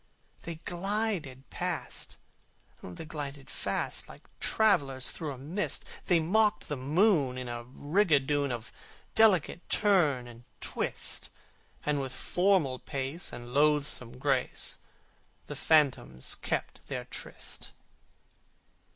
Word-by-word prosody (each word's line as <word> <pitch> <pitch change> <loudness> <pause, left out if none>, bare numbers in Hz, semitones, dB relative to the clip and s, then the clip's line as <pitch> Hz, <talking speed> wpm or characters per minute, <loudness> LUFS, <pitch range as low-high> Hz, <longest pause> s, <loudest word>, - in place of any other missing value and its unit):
They 170 - -4
glided 180 -8 -2
past, - - -4 0.6
the 90 - -8
glided 145 -2 -6
fast, - - -2
Like - - -13 0.2
travellers 145 - +3
through 155 -4 -4
a 135 - -7
mist: 165 +10 -2 0.2
They 175 -2 +5
mocked 205 +3 +2
the 150 - -1
moon 145 - +3
in 130 -1 -5
a 120 0 -5
rigadoon 145 -1 +2
Of 120 -2 -5 0.4
delicate 185 -6 +4
turn 155 - +3
and 120 0 -12 0.2
twist, - - -1 0.6
And 150 -1 +1
with 130 -1 -4
formal 175 -6 +2
pace 140 +4 -4
and 120 0 -8
loathsome 145 -4 +2
grace 135 -1 0 0.7
The - - -6
phantoms 140 - +2
kept - - -3
their - - -4
tryst. - - -7
145 Hz, 110 wpm, -30 LUFS, 130-175 Hz, 0.7 s, They